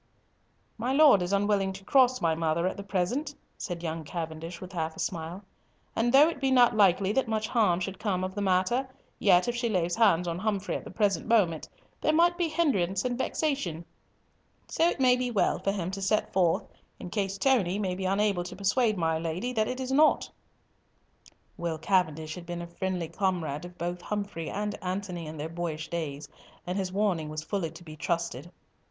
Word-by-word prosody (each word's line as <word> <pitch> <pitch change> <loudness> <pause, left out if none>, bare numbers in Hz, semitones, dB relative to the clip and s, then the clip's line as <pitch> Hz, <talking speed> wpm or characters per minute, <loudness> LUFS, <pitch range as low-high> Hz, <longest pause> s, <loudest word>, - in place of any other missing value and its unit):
"My 245 +4 0
Lord 280 -9 +7
is 175 +1 -2
unwilling 200 -1 +1
to 195 0 -10
cross 255 +3 +4
my 165 -1 +2
mother 165 +1 0
at 185 - -1
the - - -6
present," 215 - -2 0.2
said 175 -3 -5
young 160 -1 -3
Cavendish 165 +1 -6
with 185 0 -9
half 160 -2 -2
a - - -11
smile; 170 +3 -4 0.5
"and 235 +1 +2
though 280 +4 +7
it 330 -5 -4
be 270 - +2
not 245 -3 +5
likely 195 -1 +4
that 255 +2 +1
much 220 -1 -1
harm 205 -7 +2
should 190 +1 -4
come 195 -4 -1
of 185 0 -3
the 205 - -3
matter, 195 +7 +1 0.3
yet 180 -1 +4
if 240 - -1
she 240 -1 -1
laid 175 -4 0
hands 180 -6 +3
on 170 +1 -2
Humfrey 205 -1 -1
at - - -5
the - - -8
present 205 -5 0
moment, 195 -9 +2 0.3
there 310 - +2
might 345 +2 +4
be 345 -1 0
hindrance 200 - +1
and 245 -1 0
vexation, 255 - -2 0.8
so 335 - +2
it - - -4
may 255 -1 +5
be 250 0 -1
well 220 -4 +1
for 195 - 0
him 185 -3 -3
to 195 0 -5
set 210 +2 0
forth, 180 -3 +2 0.4
in 175 - -8
case 195 -1 -1
Tony 200 -7 +2 0.2
be 190 +1 -4
unable 195 -1 +1
to 180 +1 -8
persuade 210 +3 +1
my 160 -2 +1
Lady 170 +10 -3
that 215 -2 +1
it 255 - -4
is 260 0 -3
nought." 300 +3 +4 1.3
Will 170 -2 -2
Cavendish 160 -2 0
had 175 -1 -9
been 175 0 -4
a - - -5
friendly 175 0 -3
comrade 175 -5 -2
of 175 0 -11
both 175 +1 -3
Humfrey 200 -6 -4
and 210 +1 -2
Antony 180 -3 -4
in 155 +1 -7
their 150 +2 -4
boyish 165 -2 -4
days, 150 -4 -4 0.4
and 180 +1 -3
his 190 -2 -2
warning 185 -6 0
was 155 0 -5
fully 175 0 -2
to 165 +2 -13
be 155 -2 -10
trusted. 170 -1 -3
190 Hz, 200 wpm, -28 LUFS, 170-220 Hz, 1.3 s, Lord